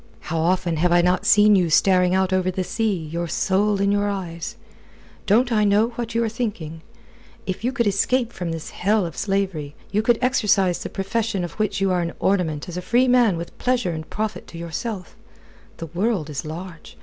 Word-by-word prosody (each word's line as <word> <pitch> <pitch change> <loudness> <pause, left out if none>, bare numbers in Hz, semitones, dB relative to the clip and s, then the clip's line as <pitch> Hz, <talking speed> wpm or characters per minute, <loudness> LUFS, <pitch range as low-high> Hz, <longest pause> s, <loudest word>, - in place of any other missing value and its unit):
"How 165 - 0
often 175 0 +1
have 175 +3 +2
I 175 0 +5
not 180 0 +1
seen 210 0 +6
you 180 -3 +2
staring 180 +2 +4
out 190 0 +1
over 185 0 +1
the 185 0 -2
sea, 220 +2 -1
your 170 +2 -3
soul 200 +4 +1
in 200 0 +2
your 205 0 +1
eyes! 175 -4 -5 0.7
Don't 240 +5 +3
I 215 -2 +3
know 210 +3 +3
what 235 -1 -6
you 230 - +2
are - - 0
thinking? 210 -9 -4 0.6
If 190 +2 -4
you 250 - +1
could 245 -3 0
escape 230 +5 +1
from 175 -2 -4
this 165 -1 -6
hell 205 +1 +1
of 165 - -6
slavery, 190 -8 -2 0.2
you 205 +2 +2
could 235 +1 +3
exercise 210 -8 +2
the - - -5
profession 205 0 -2
of 175 - -4
which 215 -2 0
you 195 -1 +2
are 180 -1 +1
an 170 0 -3
ornament 175 -6 0
as 175 0 -6
a - - -3
free 245 +7 +2
man 240 -7 +4
with 170 +1 -7
pleasure 245 -7 0
and 160 -1 -6
profit 215 0 -4
to 170 - -10
yourself. 180 +3 -5 0.6
The 165 - -6
world 175 -1 -1
is 145 - -5
large. 165 +2 -8
190 Hz, 205 wpm, -22 LUFS, 170-215 Hz, 0.7 s, seen